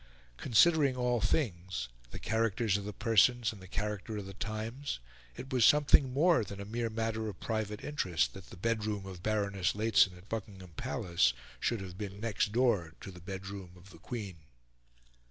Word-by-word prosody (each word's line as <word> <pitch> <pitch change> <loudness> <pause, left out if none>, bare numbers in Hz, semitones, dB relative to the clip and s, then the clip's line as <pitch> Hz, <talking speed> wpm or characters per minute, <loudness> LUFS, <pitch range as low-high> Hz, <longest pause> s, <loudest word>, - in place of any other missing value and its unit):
Considering 140 +3 +4
all 125 -2 +1
things 95 - -1 0.2
the - - -7
characters 110 -1 +1
of 100 -1 -2
the 105 - -4
persons, 115 +2 +3
and 100 - -13
the 95 - -11
character 105 +2 -3
of 100 - -5
the 95 - -8
times 110 - -4 0.4
it 130 - -7
was 125 -3 +3
something 140 -1 +6
more 160 +2 +4
than 100 0 -8
a 100 - -5
mere 115 +2 -2
matter 110 0 -2
of 95 - -9
private 110 -2 -3
interest 85 - 0
that 95 - -11
the - - -11
bedroom 105 -1 -1
of 95 -2 -8
Baroness 100 -3 0
Lehzen 105 -4 +4
at 90 +3 -16
Buckingham 95 -5 -6
Palace 90 - +1 0.3
should 115 -4 0
have 95 0 -8
been 100 -1 -5
next 110 -2 0
door 105 -9 +2
to 95 - -8
the 90 -1 -12
bedroom 95 0 -7
of 90 +2 -16
the - - -14
Queen. 105 -8 -6
105 Hz, 175 wpm, -32 LUFS, 95-115 Hz, 0.4 s, something